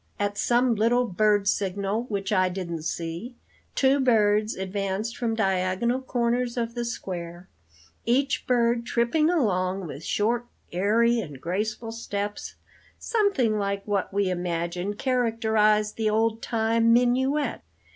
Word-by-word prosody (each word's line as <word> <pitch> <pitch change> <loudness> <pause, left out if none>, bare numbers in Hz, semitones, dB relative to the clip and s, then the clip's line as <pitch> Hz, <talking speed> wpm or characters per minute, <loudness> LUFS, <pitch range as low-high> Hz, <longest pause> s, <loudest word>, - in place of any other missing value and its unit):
At 205 0 -1
some 240 +3 +2
little 235 +3 +2
bird 205 0 +2
signal 200 +3 -1
which 200 -2 -3
I 185 -2 +3
didn't 175 -3 -4
see, 170 +9 -4 0.4
two 270 +1 +3
birds 215 -4 +3
advanced 195 +3 -3
from 230 -2 -1
diagonal 195 +4 0
corners 245 -1 -1
of 230 -1 -2
the 240 0 -3
square, 175 -6 -6 0.5
each 270 +3 0
bird 235 -1 +2
tripping 235 +7 +1
along 195 - 0
with 150 -1 -8
short, 235 +6 0 0.2
airy 225 +6 +2
and 150 - -6
graceful 215 - -3
steps, 205 -2 -5 0.4
something 335 - +1
like 200 0 -2
what 200 -3 -1
we 200 -1 +1
imagine 175 +2 -2
characterized 220 -4 +1
the 220 -1 +1
old 225 +1 +1
time 230 0 +2
'minuet.' 260 +5 +2
215 Hz, 125 wpm, -26 LUFS, 195-235 Hz, 0.5 s, I